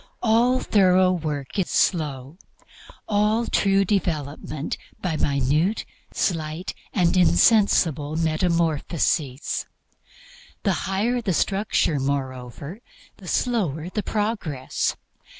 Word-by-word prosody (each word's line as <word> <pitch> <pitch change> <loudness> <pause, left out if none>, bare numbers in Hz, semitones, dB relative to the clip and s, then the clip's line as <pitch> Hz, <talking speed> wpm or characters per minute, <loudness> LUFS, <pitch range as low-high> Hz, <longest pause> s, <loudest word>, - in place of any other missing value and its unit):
All 240 +3 +3
thorough 185 -2 +4
work 150 -2 -3
is 185 - 0
slow; 150 -2 0 0.7
all 215 +2 +2
true 195 -2 +2
development 155 -5 -2 0.2
by 175 -4 -2
minute, 150 - +1 0.3
slight 160 -1 -2 0.2
and 180 -3 +2
insensible 175 - +3
metamorphoses. 160 -4 0 1.0
The 195 - +2 0.2
higher 230 +6 0
the 200 -5 -1
structure, 195 -5 +1
moreover, 135 - -4 0.4
the - - -13
slower 180 - -1
the 210 - -1
progress. 205 - -2
170 Hz, 90 wpm, -23 LUFS, 150-200 Hz, 1.0 s, thorough